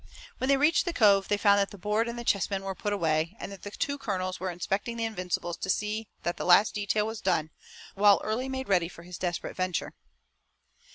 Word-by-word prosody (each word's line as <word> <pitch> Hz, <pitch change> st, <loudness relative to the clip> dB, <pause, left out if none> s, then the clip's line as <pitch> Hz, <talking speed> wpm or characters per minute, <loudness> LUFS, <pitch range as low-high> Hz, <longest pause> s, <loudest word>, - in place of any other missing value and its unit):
When 260 Hz, -, -1 dB
they 275 Hz, 0 st, +4 dB
reached 305 Hz, +7 st, +3 dB
the 345 Hz, -, -2 dB
cove 200 Hz, -6 st, +4 dB
they 205 Hz, -, +1 dB
found 200 Hz, -1 st, +4 dB
that 200 Hz, -, +1 dB
the 200 Hz, -, -11 dB
board 210 Hz, +4 st, 0 dB
and 235 Hz, -, -5 dB
the 240 Hz, -, -5 dB
chess 200 Hz, -4 st, +1 dB
men 195 Hz, -1 st, -2 dB
were 195 Hz, 0 st, -3 dB
put 205 Hz, +3 st, -3 dB
away, 165 Hz, 0 st, 0 dB
and -, -, -6 dB
the 200 Hz, +1 st, -8 dB
two 285 Hz, +7 st, -3 dB
colonels 185 Hz, -5 st, -3 dB
were 185 Hz, -, -2 dB
inspecting 195 Hz, +6 st, -3 dB
the 230 Hz, -, -1 dB
Invincibles 180 Hz, -5 st, -3 dB
to -, -, -5 dB
see 210 Hz, +3 st, -1 dB, 0.2 s
that 175 Hz, -, -2 dB
the -, -, -3 dB
last 185 Hz, +4 st, +5 dB
detail 210 Hz, +1 st, 0 dB
was 220 Hz, 0 st, -5 dB
done, 155 Hz, 0 st, 0 dB, 0.4 s
while 200 Hz, 0 st, +5 dB
Early 240 Hz, +5 st, -2 dB
made 265 Hz, 0 st, -4 dB
ready 180 Hz, -4 st, +2 dB
for 170 Hz, -, -13 dB
his 180 Hz, -1 st, -9 dB
desperate 175 Hz, -2 st, -3 dB
venture. 185 Hz, -2 st, -2 dB
200 Hz, 225 wpm, -28 LUFS, 185-220 Hz, 0.4 s, last